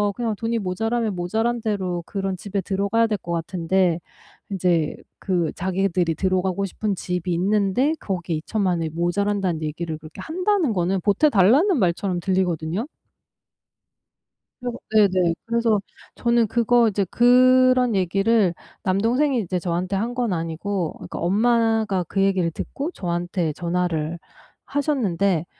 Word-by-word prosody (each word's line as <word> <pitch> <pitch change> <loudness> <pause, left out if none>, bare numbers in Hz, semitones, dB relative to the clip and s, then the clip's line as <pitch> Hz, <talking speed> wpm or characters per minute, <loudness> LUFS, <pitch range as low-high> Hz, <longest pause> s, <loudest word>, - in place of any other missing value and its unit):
그냥 230 -3 -2
돈이 230 +1 -1
모자라면 220 +3 -1
모자란 225 +7 -1
대로 190 -5 -2
그런 195 -2 -3
집에 200 +2 -3
들어가야 200 +4 +1
될 215 -2 -1
것 175 -2 -8
같은데 170 +1 0 0.5
이제 175 -5 +1 0.2
그 175 -5 0
자기들이 180 -2 0
들어가고 185 +2 0
싶은 200 +1 -2
집이 180 0 -3
있는데 205 - +2
거기에 175 -4 -3
20,000,000 185 +1 -1
원이 165 -1 -2
모자란다는 175 +1 -1
얘기를 155 +1 -4
그렇게 155 0 -11
한다는 360 - 0
거는 185 0 0
보태달라는 255 - +4
말처럼 180 -1 0
들리거든요. 180 - -1 1.8
그래서 245 -1 -4
네네, 185 -5 +4
그래서 230 -2 +2 0.4
저는 235 -1 +2
그거 235 +1 +3
이제 200 -2 0
그런 255 0 +5
얘기를 195 +2 +2 0.3
남동생이 235 +8 +1
이제 185 -3 -2
저한테 180 +2 -2
한 225 +5 -1
건 245 -4 -1
아니고 165 +2 -3
그니까 - - -7
엄마가 220 +1 +2
그 195 - -1
얘기를 190 -3 +2
듣고 280 - -5
저한테 175 - -2
전화를 170 -2 -2 0.5
하셨는데 200 - 0
195 Hz, 310 characters per minute, -23 LUFS, 175-225 Hz, 1.8 s, 그런